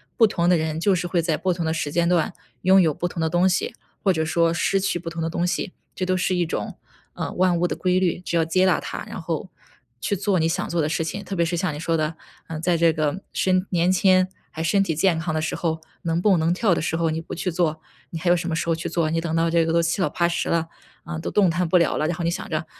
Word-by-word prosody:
不 225 - +6
同 175 -4 0
的 180 -1 +5
人 160 0 -2
就 195 +4 +3
是 180 -1 -1
会 175 -1 +1
在 165 -2 +1
不 185 - 0
同 170 -1 -3
的 160 - 0
时 150 -3 -2
间 170 +2 +2
段， 175 -1 +1 0.3
拥 190 +1 +6
有 160 -5 +3
不 175 - -2
同 175 - -7
的 160 0 +1
东 175 +2 +3
西， 185 - -1 0.3
或 195 - +4
者 160 -2 0
说 165 +1 +2
失 195 +3 +1
去 190 -2 -1
不 170 0 -6
同 165 0 -5
的 - - 0
东 170 +1 -1
西， 185 +1 -2 0.2
这 185 - -2
都 185 0 +1
是 185 0 0
一 175 -1 +1
种， 105 -10 -4 0.4
呃， - - -4
万 180 -1 +2
物 175 +1 +1
的 - - -3
规 180 0 +1
律， 180 -3 0
只 175 - -3
有 165 - +3
接 185 +3 +2
纳 185 -3 +3
它， - - -6
然 - - -6
后， 165 +4 -3 0.5
去 200 - 0
做 195 -1 +1
你 160 - +2
想 165 - -1
做 170 -1 0
的 150 - +1
事 160 - 0
情。 200 +5 -4
特 195 - -4
别 170 -2 +2
是 170 +1 -1
像 180 -2 -1
你 145 - -6
说 165 0 0
的， 155 +1 -1 0.3
呃， 160 -1 -5
在 175 0 +2
这 165 0 +4
个 155 +4 -1
身 185 0 +1
年 175 -1 +2
轻 185 0 +4 0.2
还 160 - -6
身 195 +5 +3
体 170 - -1
健 170 +2 +2
康 160 0 -2
的 155 - 0
时 160 - -2
候， 160 -2 -1 0.2
能 165 0 0
蹦、 195 -2 +4
能 165 +2 +2
跳 195 -1 +2
的 - - -1
时 165 +1 -1
候 165 -1 +1
你 160 +1 -2
不 - - -8
去 180 - -2
做， 160 -3 0 0.3
你 165 - -5
还 175 - 0
有 175 - +6
什 175 0 -3
么 165 - -1
时 165 - -2
候 165 - +2
去 165 - -4
做？ 165 -2 0
你 165 +1 0
等 165 -1 -3
到 165 0 +2
这 165 0 +3
个 165 - 0
都 170 +1 +3
七 170 +3 0
老 175 - +2
八 170 +3 +1
十 170 - -2
了， 165 -1 +1 0.4
啊， 170 -2 -5
都 160 - -4
动 200 -3 +4
弹 175 +1 0
不 180 - +4
了 170 - +2
了， - - 0
然 170 +1 -2
后 175 - -3
你 - - +2
想 170 - -4
着， 160 0 -2
170 Hz, 320 characters per minute, -23 LUFS, 160-180 Hz, 0.5 s, 不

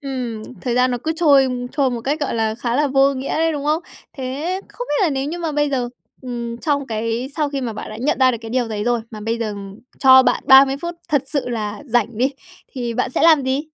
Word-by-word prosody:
Ừm, 250 -5 -4 0.2
thời 245 -3 -2
gian 250 +1 +3
nó 245 - -1
cứ 320 - 0
trôi 280 -5 +5 0.3
trôi 280 -3 +1
một 240 - -3
cách, 285 +6 -2
gọi 285 - -1
là, 220 -1 0
khá 240 +1 -2
là 295 - +3
vô 275 0 +3
nghĩa 265 +1 -5
ấy, 325 +1 +1
đúng 290 -2 -4
không? 310 +3 +1 0.3
Thế 295 +8 -3
không - - -7
biết 295 - +1
là 320 - +2
nếu 270 0 -1
như 325 +4 -4
mà 330 -3 -2
bây 295 0 +1
giờ, 250 -3 -1 0.3
ừm, 235 -2 -5
trong 285 0 -1
cái 230 +3 -2
sau 300 -2 +1
khi 280 -1 -3
mà 240 -3 -3
bạn 215 - -7
đã 215 - -7
nhận 275 +6 0
ra 260 -1 +5
được 235 - -3
cái 225 - -8
điều 245 -1 0
đấy 210 -1 -3
rồi 240 -1 +1
mà 215 -1 -8
bây 225 +2 -2
giờ 215 -3 -3 0.4
cho 260 -1 +8
bạn - - +1
30 270 0 +7
phút 345 0 -4
thật 290 -4 +2
sự 280 -3 -2
là 215 +1 -4
rảnh 235 -2 0
đi, 265 +3 +2 0.4
thì 240 -4 -4
bạn 245 - -1
sẽ - - -1
làm 315 -4 +6
gì? 260 +2 0
260 Hz, 260 wpm, -20 LUFS, 235-285 Hz, 0.4 s, cho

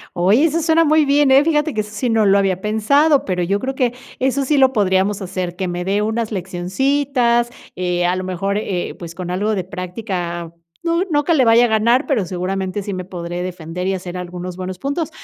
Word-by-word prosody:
Oye, 195 - +4
eso 330 +1 +1
suena 325 +1 +4
muy 310 0 +4
bien, 285 0 +3
eh, 270 +2 +6
fíjate 300 -2 +1
que 215 - 0
eso 210 0 -12
sí 245 +4 -1
no 225 -1 +3
lo 200 0 +5
había 190 -2 0
pensado, 270 +9 +3
pero 180 -2 -1
yo 200 +4 0
creo 265 +3 -3
que 250 -2 +1 0.3
eso 265 +1 0
sí 295 +3 +1
lo 265 -1 +5
podríamos 195 -2 +1
hacer, 185 -1 -4
que 185 -1 -2
me 175 0 -3
dé 200 +2 0
unas 220 +1 -2
leccioncitas, 235 +7 0 0.3
eh, 180 -1 0
a 180 +1 +1
lo 185 - -3
mejor, 185 +2 -2
eh, 185 -4 -3
pues, 170 -1 -8
con 180 0 -6
algo 205 +4 0
de 190 -3 -2
práctica, 180 -2 -5 0.3
no 335 +1 +1
no 295 -1 +2
que 335 - +2
le 270 -5 +4
vaya 230 +1 +5
a - - -3
ganar, 230 +5 +2
pero 250 -10 +1
seguramente 190 +2 -3
sí 200 0 -4
me 185 0 -5
podré 175 -1 -5
defender 180 0 -5
y 195 - +1
hacer 180 -1 -6
algunos 180 0 -6
buenos 185 0 -5
puntos. 285 - -2
200 Hz, 220 wpm, -19 LUFS, 180-265 Hz, 0.3 s, eh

